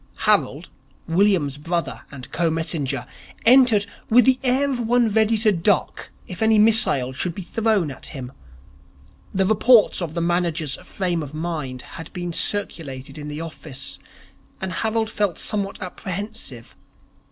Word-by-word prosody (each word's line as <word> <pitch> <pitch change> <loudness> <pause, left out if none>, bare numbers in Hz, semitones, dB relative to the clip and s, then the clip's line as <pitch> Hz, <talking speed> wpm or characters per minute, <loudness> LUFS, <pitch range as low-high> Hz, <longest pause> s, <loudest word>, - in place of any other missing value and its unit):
Harold, 190 -6 +2 0.4
William's 170 -5 +2
brother 170 +3 -3
and 135 -3 -10
co 170 -1 +1
messenger, 160 -4 -2 0.4
entered 240 -4 +6 0.2
with 240 +1 +6
the 260 -1 +4
air 265 +2 +2
of 255 - -2
one 240 0 +2
ready 220 +1 +2
to 215 0 +3
duck 190 +1 0 0.2
if 180 - -8
any 220 0 +4
missile 210 - +3
should 170 +6 -2
be 195 - -6
thrown 210 -6 0
at 135 - -9
him. 130 -4 -7 1.0
The 190 -1 +1
reports 220 +1 +4
of 165 -2 -4
the - - 0
manager's 170 -4 0
frame 175 -3 -2
of 150 0 -7
mind 155 -6 -4
had 165 -1 -10
been 175 -2 -4
circulated 155 -10 -2
in 145 - -7
the 150 +1 -5
office, 140 -4 -7 0.6
and 190 -1 -4
Harold 220 0 -1
felt 205 -5 0
somewhat 200 -2 -2
apprehensive. 185 - -6
180 Hz, 145 wpm, -22 LUFS, 155-215 Hz, 1.0 s, entered